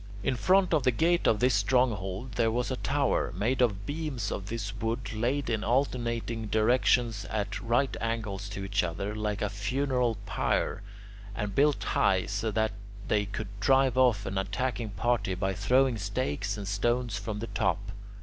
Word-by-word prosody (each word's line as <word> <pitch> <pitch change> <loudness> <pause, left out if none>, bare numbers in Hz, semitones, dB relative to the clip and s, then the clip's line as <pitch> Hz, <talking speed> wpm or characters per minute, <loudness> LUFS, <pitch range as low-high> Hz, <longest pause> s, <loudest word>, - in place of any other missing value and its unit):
In 130 - +1
front 185 +7 +3
of 155 - +4
the 130 - +3
gate 170 +8 +2
of 105 - +3
this 125 0 +3
stronghold 105 0 +1
there 115 0 +1
was 120 +3 -1
a - - 0
tower, 140 0 0
made 125 +5 +1
of 105 -5 +1
beams 145 -8 -3
of 95 - -4
this 105 -2 -4
wood 115 -1 -3
laid 125 +5 0
in 110 -2 -1
alternating 115 -3 -1
directions 115 0 +2
at 105 -2 -3
right 120 +3 +1
angles 105 -3 -3
to 100 -1 -5
each 100 0 +1
other, 90 +4 -3
like 105 -1 -2
a - - +1
funeral 125 +2 0
pyre, 100 - 0 0.5
and 105 -2 -3
built 145 +5 +3
high, 95 -1 +2
so 105 +2 -2
that 110 +1 +1 0.4
they 105 -1 +2
could 100 - -5
drive 135 +3 +3
off 125 -6 +3
an 95 - -2
attacking 110 +4 -2
party 105 -1 0
by 95 +1 -1
throwing 130 +3 +2
stakes 100 - -2
and 100 -2 -6
stones 120 +2 0
from 105 0 -4
the 110 - -4
top. 100 -3 -1
115 Hz, 170 wpm, -29 LUFS, 100-125 Hz, 0.5 s, of